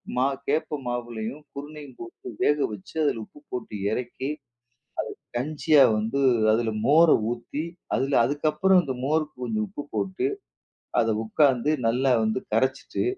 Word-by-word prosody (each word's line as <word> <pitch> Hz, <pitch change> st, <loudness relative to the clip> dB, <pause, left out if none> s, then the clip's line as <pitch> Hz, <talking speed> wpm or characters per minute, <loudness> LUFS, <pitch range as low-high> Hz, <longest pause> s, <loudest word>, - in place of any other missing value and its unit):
மா 130 Hz, +1 st, +3 dB, 0.2 s
கேப்ப 150 Hz, +1 st, 0 dB
மாவுலையும், 120 Hz, +3 st, -4 dB
குருணையும் 145 Hz, -2 st, -9 dB
போட்டு 115 Hz, +1 st, -10 dB
வேக 150 Hz, -, +4 dB
வச்சு, 105 Hz, +7 st, -10 dB
அதுல 115 Hz, -6 st, +1 dB
உப்பு 150 Hz, -, -15 dB
போட்டு 115 Hz, -3 st, -5 dB, 0.2 s
இறக்கி, 125 Hz, +3 st, -3 dB, 0.8 s
அது -, -, -29 dB
கஞ்சியா 150 Hz, +1 st, +4 dB
வந்து 115 Hz, +6 st, -1 dB, 0.3 s
அதுல 115 Hz, 0 st, +1 dB
மோர 165 Hz, +4 st, +6 dB, 0.2 s
ஊத்தி 120 Hz, +5 st, -4 dB, 0.3 s
அதுல 135 Hz, +1 st, +1 dB
அதுக்கப்புறம் 155 Hz, +6 st, +3 dB
இந்த 130 Hz, -3 st, -3 dB
மோருக்கு 155 Hz, +1 st, 0 dB
கொஞ்சம் 110 Hz, -3 st, -1 dB
உப்பு 145 Hz, -, -7 dB
போட்டு, 190 Hz, -, -1 dB, 0.7 s
அத 115 Hz, -, +1 dB, 0.2 s
உட்காந்து 135 Hz, +3 st, +3 dB
நல்லா 125 Hz, +3 st, +3 dB
வந்து 110 Hz, +3 st, 0 dB
கரச்சுட்டு, 130 Hz, -, 0 dB
135 Hz, 130 wpm, -26 LUFS, 120-150 Hz, 0.8 s, மோர